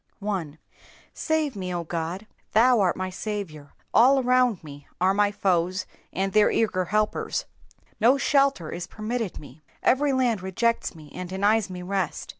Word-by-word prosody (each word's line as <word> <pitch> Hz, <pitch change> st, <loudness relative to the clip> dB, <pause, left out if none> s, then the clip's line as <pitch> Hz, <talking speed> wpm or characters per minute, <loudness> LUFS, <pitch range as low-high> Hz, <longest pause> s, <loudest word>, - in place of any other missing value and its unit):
1. 190 Hz, -8 st, -4 dB, 0.6 s
^^8ave 315 Hz, -5 st, -1 dB
me, 190 Hz, -2 st, -5 dB
0 175 Hz, -1 st, -2 dB
Ood.^^ 170 Hz, +4 st, -4 dB, 0.3 s
Thou 240 Hz, +2 st, +5 dB
art 185 Hz, -3 st, +2 dB
my 185 Hz, 0 st, -3 dB
Saviour; 185 Hz, -8 st, -6 dB, 0.2 s
all 265 Hz, +4 st, +6 dB
around 250 Hz, -6 st, +2 dB
me 145 Hz, -2 st, -11 dB
are 185 Hz, +2 st, +3 dB
my 205 Hz, 0 st, +2 dB
foes 185 Hz, -1 st, 0 dB, 0.3 s
and 195 Hz, 0 st, -2 dB
their 215 Hz, -1 st, +5 dB
eager 185 Hz, -5 st, +1 dB
helpers. 210 Hz, +3 st, -1 dB, 0.5 s
No 240 Hz, +5 st, +5 dB
shelter 275 Hz, -, +2 dB
is 175 Hz, -, -5 dB
permitted 220 Hz, -1 st, -4 dB
me. 145 Hz, +1 st, -13 dB, 0.2 s
Every 285 Hz, +2 st, +3 dB
land 245 Hz, -6 st, +1 dB
rejects 190 Hz, +3 st, -1 dB
me 155 Hz, -3 st, -14 dB
and 180 Hz, -1 st, -6 dB
denies 200 Hz, +2 st, +1 dB
me 180 Hz, -1 st, -7 dB
rest. 190 Hz, 0 st, -3 dB
195 Hz, 155 wpm, -25 LUFS, 180-230 Hz, 0.6 s, all